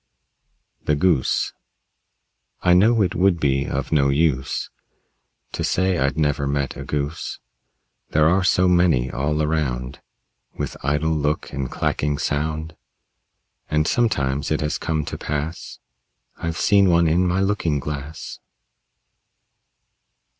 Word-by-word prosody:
THE 75 - +1
GOOSE 75 -3 +1 1.1
I 90 - +5
know 110 +4 +5
it 90 -2 -1
would 90 -2 +2
be 70 -2 +1
of 70 0 -3
no 70 -3 +3
use 70 -2 0 0.8
To - - -3
say 95 -1 +1
I'd 70 +1 0
never 75 -2 +1
met 70 -1 -1
a - - -6
Goose. 75 +2 -3 0.7
There 75 0 +3
are 90 +3 +3
so 90 0 +3
many 85 -8 +3
all 75 +3 -1
around, 70 -4 -2 0.6
With - - -4
idle 75 +3 0
look 75 0 -1
and 70 -3 -3
clacking 75 0 -1
sound. 80 +2 -2 0.9
And 75 0 +1
sometimes 70 - 0
it - - 0
has 75 0 -1
come 80 -2 -1
to - - -6
pass 75 +3 -4 0.6
I've 85 -1 -4
seen 100 -2 +4
one 85 -1 +4
in 90 +3 +2
my 90 +2 +1
looking 95 -6 0
glass. 75 +2 -6
75 Hz, 125 wpm, -22 LUFS, 70-85 Hz, 1.1 s, I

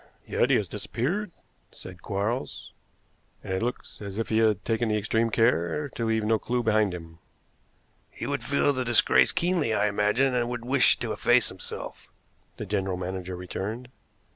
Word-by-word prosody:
"Yet - - +1
he - - +5
has - - +1
disappeared," 175 - -3 0.4
said 90 -2 -11
Quarles, 105 +6 -3 0.7
"and 95 - -4
it 95 - -1
looks 120 -1 -4
as 100 -1 -6
if 115 - -2
he 110 - +2
had 110 -3 +2
taken 115 0 0
extreme 110 +2 +1
care 115 - +1
to 115 - -4
leave 110 -1 +1
no 110 +1 +2
clew 125 0 -1
behind 110 -3 +3
him." 80 -2 -9 0.9
"He - - -7
would 140 -3 -2
feel 140 +3 +2
the 130 -1 -1
disgrace 120 -2 +4
keenly, 170 -10 +1
I - - +2
imagine, 105 +6 +2
and 120 -1 0
would 120 -1 -5
wish 130 +1 +4
to - - -3
efface - - +3
himself," - - -8 0.5
the - - -5
general 95 -2 -1
manager 90 0 -4
returned. 100 +7 -5
110 Hz, 165 wpm, -27 LUFS, 100-125 Hz, 0.9 s, he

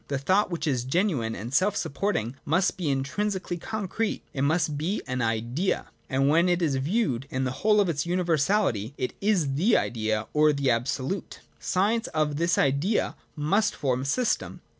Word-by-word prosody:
The 140 - -1
thought, 185 +10 +2
which 170 -2 -3
is 130 -6 0
genuine 135 - 0
and 115 +5 -6
self 195 +8 +3
sup - - -3
porting, 140 - -1
must 180 +6 +1
be 175 -5 -2
intrinsically 175 +7 -2
concrete; 220 +2 -3
it 135 - -3
must 155 +1 +1
be 165 +8 -2
an 125 0 -2
Idea; 115 - -1 0.2
and 135 0 +2
when 165 +5 +4
it 175 0 +2
is 155 -6 +1
viewed 135 - 0
in 130 0 -2
the 130 - -1
whole 210 0 +4
of 200 - +3
its 165 -1 -1
univer 175 -3 +1
sality, 145 - +1
it 125 - -2
is 185 -9 +2
the 185 - +3
Idea, 110 -1 -1
or 150 0 +4
the 140 -2 +1
Absolute. 130 +9 -2 0.2
The - - -23
science 210 +5 +1
of 150 -2 +1
this 170 +1 +1
Idea 145 +10 +1 0.2
must 170 +8 +1
form 130 -3 0
a - - -4
system. 235 - -1
155 Hz, 185 wpm, -26 LUFS, 130-190 Hz, 0.2 s, when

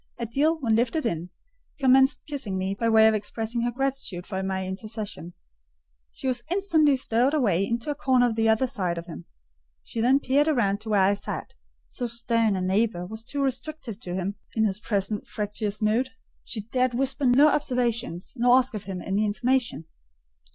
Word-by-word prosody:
Adèle, 285 +8 +1
when 225 -4 +2
lifted 245 +6 0
in, 175 -5 -2 0.5
commenced 265 0 +4
kissing 270 -10 -4
me, 190 +1 -1
by 230 +3 0
way 220 0 +6
of 220 - +4
expressing 225 +2 -3
her 240 - +1
gratitude 255 -8 -3
for 190 -1 -3
my 190 0 -2
intercession: 205 -2 -6 0.8
she - - -5
was 250 -2 0
instantly 330 -7 +3
stowed 255 +3 +1
away 200 - +2
into 235 +7 -2
a - - 0
corner 260 -4 +3
on 240 - +1
the 225 0 +2
other 220 +4 +3
side 185 -9 -2
of 170 - -5
him. 85 - -9 0.6
She 225 - -4
then 260 +4 +4
peeped 285 +2 +2
round 210 -9 +1
to 220 - -7
where 205 -3 +4
I 195 +2 +4
sat; 200 - -5 0.3
so 245 - -4
stern 230 -2 +1
a 185 - -2
neighbour 190 -1 0
was 220 +4 -8
too 280 +3 -3
restrictive: 265 -4 -4
to 180 -6 -5
him, 190 +2 -3 0.2
in 220 - +2
his 195 -1 0
present 205 -1 -2
fractious 210 0 -3
mood, 230 +5 +2 0.3
she 220 - -5
dared 250 +3 0
whisper 270 +1 +1
no 275 +5 +6
observations, 240 - -1
nor 245 0 +5
ask 260 -1 +1
of 210 -4 -6
him 185 -2 -5
any 200 +2 0
information. 230 - 0
230 Hz, 185 wpm, -26 LUFS, 200-260 Hz, 0.8 s, way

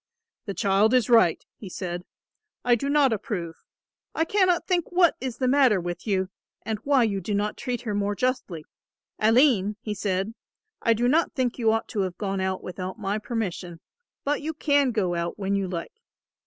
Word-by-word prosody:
"The 200 - -4
child 205 +3 +3
is 245 -2 +2
right," 225 -8 +4
he 200 - -9
said, 175 -1 -5 0.6
"I 245 - +4
do 260 +4 0
not 285 -4 +4
approve. 180 -6 -4 0.6
I 320 - +2
cannot 370 -2 +2
think 355 -3 0
what 355 -2 +4
is 255 -3 -4
the 255 - 0
matter 255 -6 +4
with 175 +3 -5
you 190 -2 0 0.3
and 220 -2 -3
why 275 +1 +3
you 200 -4 0
do 205 +3 -2
not 210 +1 -1
treat 250 -3 -3
her 215 -4 -3
more 205 0 0
justly. 200 - -2 0.5
Aline," 220 -3 +4
he 215 -2 -4
said, 195 +1 -2 0.5
"I 230 - +4
do 240 +2 +1
not 315 +6 +2
think 250 -2 -1
you 225 -2 +3
ought 225 0 -1
to 210 - -3
have 185 -2 -2
gone 195 -2 -2
out 190 0 -2
without 185 +2 -6
my 205 0 -2
permission, 185 -7 -4 0.4
but 290 +1 0
you 315 +1 -4
can 285 -3 +2
go 205 -7 0
out 170 +2 -3
when 200 -1 -2
you 195 -1 0
like. 170 -2 -5
215 Hz, 190 wpm, -25 LUFS, 190-255 Hz, 0.6 s, right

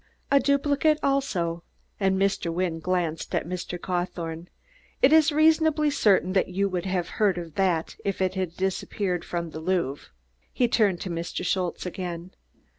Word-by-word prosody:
"A 280 - +6
duplicate 285 +2 +2
also," 190 -12 0 0.4
and 190 -1 +2
Mr. 195 -3 0
Wynne 170 -1 -1
glanced 170 -2 -2
at - - 0
Mr. 180 0 -4
Cawthorne. 175 -2 -3 0.5
"It 280 - +5
is 315 0 +6
reasonably 310 0 +3
certain 195 -8 +3
that 190 - +2
you 195 +2 0
would 185 -1 -3
have 185 -2 -1
heard 200 -4 +3
of 170 -3 -6
that 180 -3 0
if 200 -1 -2
it 185 -1 +1
had 185 -3 -3
disappeared 190 -1 -2
from 170 -2 -4
the 160 - -6
Louvre." 160 -5 -1 0.4
He 245 - +2
turned 205 -6 +2
to 185 - -4
Mr. 170 +2 -4
Schultze 180 0 -1
again. 180 -1 -5
185 Hz, 160 wpm, -26 LUFS, 170-210 Hz, 0.5 s, A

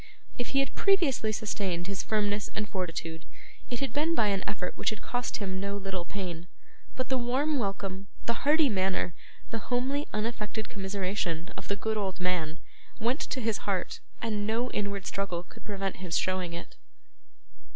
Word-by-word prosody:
If 245 - 0
he 275 - +4
had 275 - -1
previously 325 - +4
sustained 200 -5 0
his 195 0 -1
firmness 205 -1 +1
and 215 -1 0
fortitude, 165 -4 -2 0.5
it 245 0 -1
had 275 - 0
been 315 +3 +3
by 215 -7 +5
an 195 -1 +1
effort 180 -3 -2
which - - +2
had 215 - -4
cost 245 -1 0
him 190 -2 -1
no 200 +1 -1
little 190 -3 -2
pain; 180 -4 -4 0.5
but 255 - -1
the 260 -1 +3
warm 270 +5 +2
welcome, 195 -2 -1 0.2
the 235 - +3
hearty 300 +5 +5
manner, 190 -5 +2 0.4
the 225 - 0
homely 265 +4 +2
unaffected 215 0 -1
commiseration, 190 -3 -1
of - - -6
the 200 - +2
good 220 +2 0
old 195 -3 -1
man, 175 -3 +1 0.4
went 240 +6 +2
to 265 - -1
his 225 -2 +2
heart, 185 -3 0 0.2
and 210 -2 +1
no 235 +3 +1
inward 200 -1 -1
struggle 185 -3 -1
could - - -15
prevent 195 -2 -1
his 180 -2 0
showing 185 -2 +1
it. 170 - -7
205 Hz, 170 wpm, -31 LUFS, 185-235 Hz, 0.5 s, by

